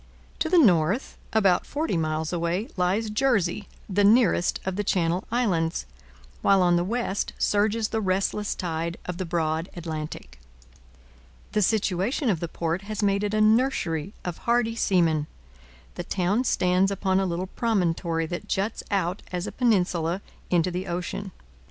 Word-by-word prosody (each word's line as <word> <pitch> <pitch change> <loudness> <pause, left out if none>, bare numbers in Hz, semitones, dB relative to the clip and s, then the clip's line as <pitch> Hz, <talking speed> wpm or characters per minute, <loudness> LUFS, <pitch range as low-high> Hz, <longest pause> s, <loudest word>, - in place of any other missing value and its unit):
To 320 - 0
the 360 - +4
north, 195 - +3 0.2
about 195 -5 +3
forty 295 - -2
miles 160 0 -1
away, 175 +5 -1
lies 195 +4 0
Jersey, 210 -6 +1 0.2
the 205 +1 +1
nearest 215 -4 +4
of 190 -1 -2
the 205 - -1
Channel 180 -2 0
Islands, 185 -9 0 0.6
while 195 -2 +4
on 175 -1 +4
the 175 - +2
west 210 0 -2
surges 215 +2 +1
the 220 - -1
restless 195 +2 0
tide 170 -1 -3
of 180 0 -5
the 185 - -3
broad 165 0 -1
Atlantic. 155 - -6 1.1
The 210 - +1
situation 210 - +1
of 175 - -1
the 170 - -3
port 165 +2 -2
has 215 +1 -4
made 200 0 +2
it 210 0 -1
a 215 - +2
nursery 215 - +2
of 175 -2 -4
hardy 235 -1 +1
seamen. 165 -8 +2 0.7
The 175 - -5
town 195 +7 0
stands 180 -2 +2
upon 190 -1 +1
a 195 - +1
little 175 +1 -2
promontory 175 -6 0
that 175 +5 -5
juts 205 +3 -1
out 190 -2 -1
as 180 0 -2
a - - -5
peninsula 185 -6 +1 0.3
into 175 0 +2
the 180 +2 -4
ocean. 180 +3 -4
185 Hz, 155 wpm, -25 LUFS, 170-210 Hz, 1.1 s, the